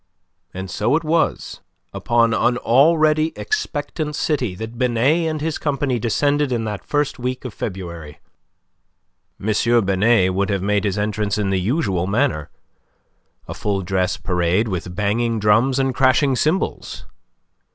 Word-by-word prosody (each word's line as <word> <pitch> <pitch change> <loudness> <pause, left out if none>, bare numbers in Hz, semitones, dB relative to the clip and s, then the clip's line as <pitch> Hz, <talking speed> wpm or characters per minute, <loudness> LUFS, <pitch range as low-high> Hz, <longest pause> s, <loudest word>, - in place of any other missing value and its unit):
And 95 +1 -6
so 105 +7 +1
it 165 - 0
was 165 +1 -1 0.3
upon 115 -1 +2
an 120 +2 +2
already 155 +5 +3
expectant 155 - -3
city 130 - -1
that 110 +4 -7
Binet 130 +7 +2
and 155 -1 -4
his 160 0 -2
company 140 -4 -1
descended 145 +5 +1
in 120 -2 -1
that 105 -2 -5
first 145 -2 -1
week 125 +1 -4
of 125 - -6
February. 85 -8 -7 1.2
M. 110 +2 +2
Binet 95 0 +3
would 100 +2 0
have 100 -2 -1
made 105 +1 +1
his 100 -1 -1
entrance 105 0 -1
in 100 -2 -1
the 95 -1 +1
usual 95 - 0
manner 105 - 0 1.0
a - - -5
full 100 -2 -2
dress 95 +1 -1
parade 90 +3 0
with 90 -2 -4
banging 110 +3 0
drums 115 +6 +3
and 135 -1 +1
crashing 130 +1 +3
cymbals. 160 +9 -2
115 Hz, 140 wpm, -20 LUFS, 100-140 Hz, 1.2 s, already